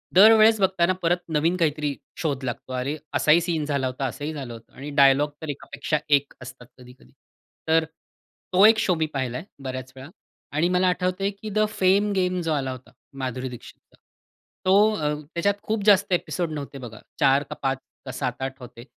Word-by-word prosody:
दरवेळेस 220 +2 +7
बघताना 185 -1 +2
परत 175 +1 +2
नवीन 160 +4 +1
काहीतरी 150 -3 0 0.2
शोध 140 -5 -2
लागतो. 130 +1 -5
अरे, 135 +4 -2 0.2
असाही 155 +3 +4
सीन 165 -3 -1
झाला 140 -3 -1
होता, 130 +2 -3
असंही 145 +4 -4
झालं 135 -6 -6
होतं 115 - -14
आणि 140 +2 -8
डायलॉग 140 +2 +5
तर 160 - -6
एकापेक्षा 145 +2 -3
एक 145 -1 +2
असतात 125 -1 -11
कधी-कधी. 125 0 -17 0.6
तर 160 0 +3 0.7
तो 195 +3 +7
एक 220 0 +7
शो 185 - +2
मी 160 - 0
पाहिलाय 130 +1 -3 0.2
बऱ्याच 130 -1 -6
वेळा, 135 +3 -10 0.4
आणि 155 +4 +1
मला 180 0 +2
आठवतंय 185 +2 0
की 215 - -6
द 215 +1 -1
फेम 205 0 +2
गेम 185 -1 0
जो 165 -2 -2
आला 135 -3 -1
होता 130 -2 -10 0.3
माधुरी 130 0 -3
दीक्षितचा, 120 -2 -13 0.7
तो 205 +3 +5
अ, 150 -3 -1 0.2
त्याच्यात 200 +4 +1
खूप 215 -1 -2
जास्त 200 -2 +4
ॲपिसोड 175 -1 -1
नव्हते 145 -2 -6
बघा. 115 -3 -9 0.2
4 140 -1 +4
का - - -8
5 135 0 +1 0.3
का 130 - -5
7-8 130 +1 -4
होते. 120 -1 -11
150 Hz, 175 wpm, -24 LUFS, 130-180 Hz, 0.7 s, दरवेळेस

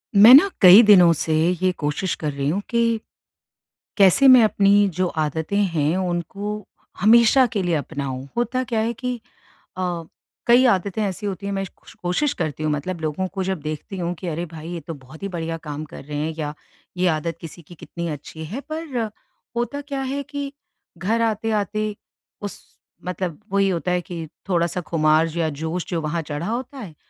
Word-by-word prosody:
मैं 220 +5 +10
ना 315 +9 +9
कई 190 +3 +10
दिनों 185 -5 +7
से 160 0 -2 0.3
ये 185 0 +3
कोशिश 150 +5 -1
कर 150 -2 -3
रही 140 0 -3
हूँ 195 +6 0
कि, 230 -1 +1 1.0
कैसे 200 +7 +5
मैं 255 -2 +9
अपनी 200 -1 +4
जो 185 +2 +1
आदतें 160 +5 -2
हैं 170 -5 +1
उनको 190 +3 -3 0.3
हमेशा 235 +5 +6
के 205 -4 0
लिए 175 -2 0
अपनाऊँ? 140 -3 -4
होता 240 +2 0
क्या 235 -3 -1
है 225 +2 0
कि 250 +2 -3 0.6
अ, 175 -2 -2 0.4
कई 240 +2 +6
आदतें 200 -1 +1
ऐसी 200 +1 -3
होती 200 0 -4
हैं 200 - -2
मैं 195 0 -2
कुश - - -16
कुश - - -16
कोशिश 215 +12 +1
करती 155 -2 -3
हूँ, 155 - 0
मतलब 165 +4 -3
लोगों 160 +4 -2
को 190 -2 -2
जब 190 -4 -2
देखती 155 +6 -5
हूँ 175 0 -2
कि 185 - -5
अरे 170 +2 -3
भाई 160 +1 -8
ये 170 - -4
तो 165 - -5
बहुत 135 +4 -14
ही 200 - -2
बढ़िया 165 -3 -4
काम 150 +1 -4
कर - - -9
रहे 145 +1 -6
हैं 155 +2 -2
या 150 -1 -3 0.4
ये 180 +1 +1
आदत 160 0 -1
किसी 165 +1 -10
की 170 +3 -14
कितनी 170 +1 -6
अच्छी 160 +1 -7
है। 205 - -5
पर 315 -3 -5 0.6
होता 240 +4 -2
क्या 280 -1 -5
है 270 +2 -3
कि 285 0 -6 0.5
घर 215 +6 0
आते-आते 215 -1 -1 0.5
उस 205 -1 -6 0.4
मतलब 180 -2 -4
वही 195 0 +3
होता 180 -1 -1
है 180 0 +1
कि 170 -2 -7 0.2
थोड़ा-सा 175 -1 0
खुमार 155 -1 +2
या 165 -2 +1
जोश 160 +4 -3
जो 170 - -1
वहाँ 165 +2 -2
चढ़ा 150 +1 -5
होता 245 +5 -4
है, 195 -11 -8
180 Hz, 190 wpm, -22 LUFS, 160-215 Hz, 1.0 s, मैं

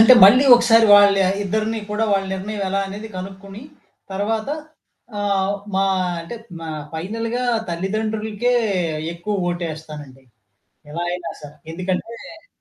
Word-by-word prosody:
అంటే, 240 +3 +9
మళ్ళీ 255 +8 +7
ఒకసారి 230 -2 +5
వాళ్ళ 205 -1 +7 0.3
ఇద్దరిని 220 +3 -1
కూడా 210 +2 0
వాళ్ళ 195 -1 +1
నిర్ణయం 200 +2 -4
ఎలా 195 +1 0
అనేది 210 +3 -7
కనుక్కొని 195 +3 -8 0.5
తర్వాత 215 +4 -2 0.7
ఆహ్, 200 -1 0 0.2
మా 195 0 +2 0.4
అంటే 165 +8 -8 0.3
మా 165 - -7 0.2
ఫైనల్‌గా 225 +9 -3 0.2
తల్లిదండ్రులకే 215 +5 -2 0.6
ఎక్కువ 180 +1 -3
ఓటేస్తానండి, 155 -6 -7 0.7
ఎలా 170 +3 -3
అయినా 175 -2 -4
సరే. 150 +1 -11 0.2
ఎందుకంటే 195 - -5
200 Hz, 115 wpm, -21 LUFS, 180-220 Hz, 0.7 s, అంటే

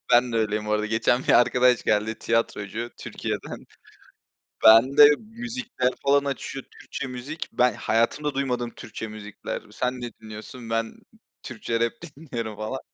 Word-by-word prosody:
Ben 120 0 +5
de - - 0
öyleyim 105 -1 0
bu 105 - -1
arada, 105 0 +1
geçen 115 +3 +1
bir - - +4
arkadaş 125 0 +3
geldi, 110 +1 +1
tiyatrocu, 115 0 -1
Türkiye'den. - - -5 1.0
Bende, 130 +6 +8
müzikler 230 - -3
falan 140 0 +3
açıyor, 135 -1 -4
Türkçe 140 - -7
müzik. 130 +5 -6
Ben 125 -2 +3
hayatımda 120 +8 0
duymadığım 125 -3 -1
Türkçe 110 0 -7
müzikler. 105 -1 -7
Sen 125 0 -2
ne 120 -1 -5
dinliyorsun? 110 +2 -10
Ben 115 0 -1 0.5
Türkçe 115 0 -3
rap 115 0 +1 0.2
dinliyorum 115 -8 -5
falan. 110 +5 -4
120 Hz, 140 wpm, -25 LUFS, 110-135 Hz, 1.0 s, Bende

